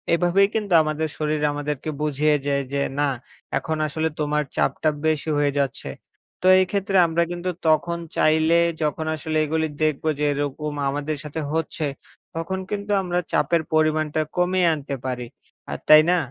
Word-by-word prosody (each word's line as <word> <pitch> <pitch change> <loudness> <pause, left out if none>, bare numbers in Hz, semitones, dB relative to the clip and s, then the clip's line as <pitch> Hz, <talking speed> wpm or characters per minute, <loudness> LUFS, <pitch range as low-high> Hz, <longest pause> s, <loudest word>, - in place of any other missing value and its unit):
এভাবেই 180 +3 +3
কিন্তু 210 -4 -1
আমাদের 155 +1 -1
শরীর 155 0 -1
আমাদেরকে 145 0 -4
বুঝিয়ে 150 0 +2
যায় 140 -1 +1
যে, 140 - +1 0.2
না 145 -1 +2 0.5
এখন 155 +3 -2
আসলে 160 +2 -1
তোমার 150 0 0
চাপটা 155 - +1 0.2
বেশি 155 0 0
হয়ে 145 -1 +2
যাচ্ছে। 135 -3 -2 0.5
তো 185 - +1
এই 185 - +4
ক্ষেত্রে 195 -1 0
আমরা 165 +1 +1
কিন্তু 175 +1 -3 0.2
তখন 165 +2 +2 0.2
চাইলে 160 +2 +4 0.2
যখন 155 +1 -1
আসলে 155 0 -3
এগুলো 160 +1 0 0.2
দেখবো 155 0 0
যে, 150 - +1
এরকম 145 +1 -3 0.2
আমাদের 145 +2 -3
সাথে 150 +1 -5
হচ্ছে 160 0 -2 0.5
তখন 170 +4 -3
কিন্তু 205 0 -3
আমরা 180 -1 -1
চাপের 170 -1 +2
পরিমাণটা 155 0 +2 0.2
কমিয়ে 180 0 +2
আনতে 145 -2 -4
পারি। 125 -2 -3 0.4
আ - - -3 0.2
তাই 155 0 +10
না? 180 - +3
155 Hz, 160 wpm, -23 LUFS, 150-170 Hz, 0.5 s, তাই